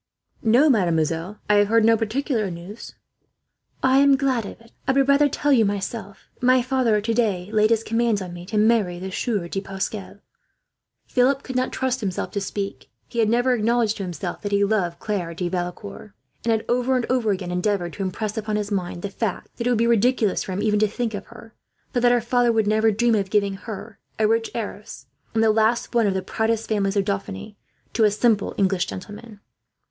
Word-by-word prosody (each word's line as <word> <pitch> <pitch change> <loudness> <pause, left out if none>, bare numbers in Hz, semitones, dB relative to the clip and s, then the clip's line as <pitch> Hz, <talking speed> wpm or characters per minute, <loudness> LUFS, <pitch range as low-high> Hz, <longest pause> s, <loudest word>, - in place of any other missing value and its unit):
"No, 245 +6 +4
mademoiselle, 170 - +1
I 210 - +4
have 205 0 +4
heard 225 +1 +3
no 225 0 +6
particular 225 0 -1
news." 180 +6 -9 0.9
"I 265 +1 +5
am 280 -1 +5
glad 260 -6 0
of - - -10
it. 230 0 -20 0.2
I 270 - +3
would 270 0 +3
rather 285 +1 +4
tell 290 0 +1
you 235 -4 +5
myself. 200 0 -4 0.2
My 255 0 +4
father 255 -3 +1
has, 210 - 0
today, 215 -5 0
laid 215 0 +4
his 225 -1 +2
commands 230 -2 +1
on 180 -2 -7
me 175 0 -9
to 215 +1 -2
marry 210 -5 +3
the 190 +2 -6
Sieur 200 -3 -2
de 195 +3 -3
Pascal." 195 +1 -5 0.9
Philip 265 +2 +2
could 260 - -7
not 255 0 0
trust 260 0 -1
himself 190 -4 -3
to 200 - -2
speak. 195 0 -5 0.2
He 235 - -4
had 220 -2 +3
never 245 +2 +3
acknowledged 230 -1 +1
to 200 - -4
himself 175 0 -5
that 205 - -4
he 200 0 +3
loved 195 -5 0
Claire 180 -6 -3
de 180 +1 -2
Valecourt; 175 - -5 0.3
and 230 - +2
had, 220 -1 0
over 250 +2 +1
and 250 -2 0
over 250 -4 +1
again, 185 -3 -2
endeavoured 180 -1 -1
to - - -7
impress 205 +3 -3
upon 215 -1 -2
his 210 0 -2
mind 180 -3 -3
the 200 - -2
fact 210 -2 -4
that 235 - -2
it - - +3
would 245 - +2
be 230 - +2
ridiculous 235 -2 +2
for - - -5
him 200 +3 -2
even 210 -1 +2
to 215 - +3
think 225 +2 -3
of 200 -1 -6
her; 225 -1 -14 0.4
for 245 - +1
that 245 0 +4
her 245 -1 +3
father 240 +1 +2
would 220 -2 +2
never 220 +1 +3
dream 230 +3 +2
of 200 -3 0
giving 200 -1 +1
her, 210 +1 -8 0.2
a 215 - +3
rich 225 +1 +1
heiress, 210 - -6 0.3
and 225 - +3
the 220 - +5
last 225 +2 +2
of - - -22
one 230 -3 +3
of 195 - 0
the 190 - -2
proudest 220 +3 -1
families 200 -2 0
of 195 - +2
Dauphiny, 200 +1 -4 0.4
to 225 - +2
a 210 - +6
simple 215 0 +1
English 190 -2 +1
gentleman. 210 +3 -9
215 Hz, 215 wpm, -23 LUFS, 195-235 Hz, 0.9 s, no